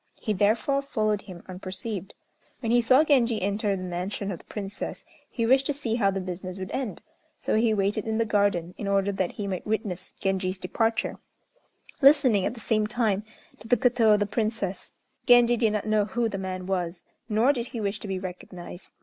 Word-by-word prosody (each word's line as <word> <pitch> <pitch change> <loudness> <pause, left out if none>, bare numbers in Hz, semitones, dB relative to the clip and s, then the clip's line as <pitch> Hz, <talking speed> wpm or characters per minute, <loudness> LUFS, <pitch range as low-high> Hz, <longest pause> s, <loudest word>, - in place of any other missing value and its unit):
He 215 - -1
therefore 215 +8 +2
followed 215 -6 0
him 185 -4 -11
unperceived. 190 +1 -6 0.4
When 230 -3 -2
he 240 0 +5
saw 255 +5 +5
Genji 245 -7 +3
enter 200 +1 0
the 185 - -5
mansion 185 +3 -3
of 175 - -5
the - - -19
Princess, 200 -1 -6 0.2
he 230 - -1
wished 265 +3 +4
to 290 - +1
see 250 -6 -2
how 220 -4 +3
the 195 0 -1
business 185 0 -5
would 190 0 -6
end; 260 -6 -4 0.4
so - - -1
he 220 +1 +3
waited 205 +2 0
in 220 0 0
the 230 - +2
garden, 200 -5 +1
in 205 - -3
order 200 0 +2
that 190 -2 -2
he 205 - -4
might 190 -1 -4
witness 210 -4 -2
Genji's 190 -1 -1
departure, 225 +3 -1 0.8
listening, 270 -8 +5
at - - -4
the - - -10
same 215 -1 +1
time, 215 -3 0 0.4
to 225 - -8
the 245 - +4
koto 235 -2 +4
of 210 - +3
the 205 - +2
Princess. 210 -2 -2 0.4
Genji 240 -1 +7
did 225 -2 +2
not 210 - -1
know 215 -1 +2
who 230 +3 0
the 195 -3 -4
man 185 -1 -4
was, 180 -2 -2 0.3
nor 225 +6 +4
did 240 -3 -3
he 235 - -6
wish 205 0 -2
to - - -7
be 190 -1 -2
recognized. 180 -1 -8
210 Hz, 200 wpm, -26 LUFS, 190-230 Hz, 0.8 s, Genji